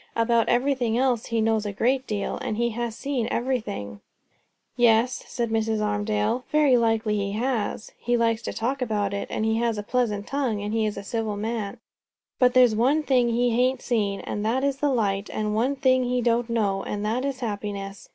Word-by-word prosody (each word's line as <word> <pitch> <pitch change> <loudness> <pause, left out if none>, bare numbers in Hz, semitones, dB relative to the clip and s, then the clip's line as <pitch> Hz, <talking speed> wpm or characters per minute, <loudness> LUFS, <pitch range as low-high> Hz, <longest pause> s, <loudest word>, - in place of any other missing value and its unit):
"About 230 0 +2
everything 245 -2 +1
else 250 -3 +1
he 230 -1 0
knows 220 -1 +1
a 205 - -3
great 255 +6 0
deal; 205 -2 -2
and 215 - -3
he 235 0 +1
has 235 0 -3
seen 270 -5 -2
everything." 215 - -3 0.7
"Yes," 240 +1 +3
said 235 -2 -3
Mrs. 220 -1 0
Armadale; 210 +3 0
"very 300 -4 +4
like 225 -2 +2
he 205 -2 -1
has; 225 -1 -2
and - - -30
he 240 0 +1
likes 230 -1 +1
to - - -4
talk 260 +4 -2
about 210 -4 -1
it; 200 - -3
and 215 - -2
he 220 0 +1
has 230 -1 0
a 210 - -3
pleasant 210 -3 -1
tongue; 265 -7 -1
and 205 +1 -4
he 220 -1 +1
is 210 - -4
a 200 - -5
civil 220 0 -3
man. 220 +1 -3 0.6
But 250 -1 +4
there's 250 -3 +6
one 270 +8 +2
thing 250 -4 +3
he 240 +1 +2
hain't 250 +2 +1
seen, 205 -5 0
and 205 - -4
that 240 +5 0
is 280 -1 0
the 290 +1 +1
light; 205 -5 0
and 210 0 -2
one 245 +6 +1
thing 260 -1 +3
he 250 0 0
don't 235 0 +1
know, 205 -4 0
and 205 +1 -4
that 230 +4 0
is 275 -2 -3
happiness. 205 -3 -5
230 Hz, 205 wpm, -25 LUFS, 210-250 Hz, 0.7 s, there's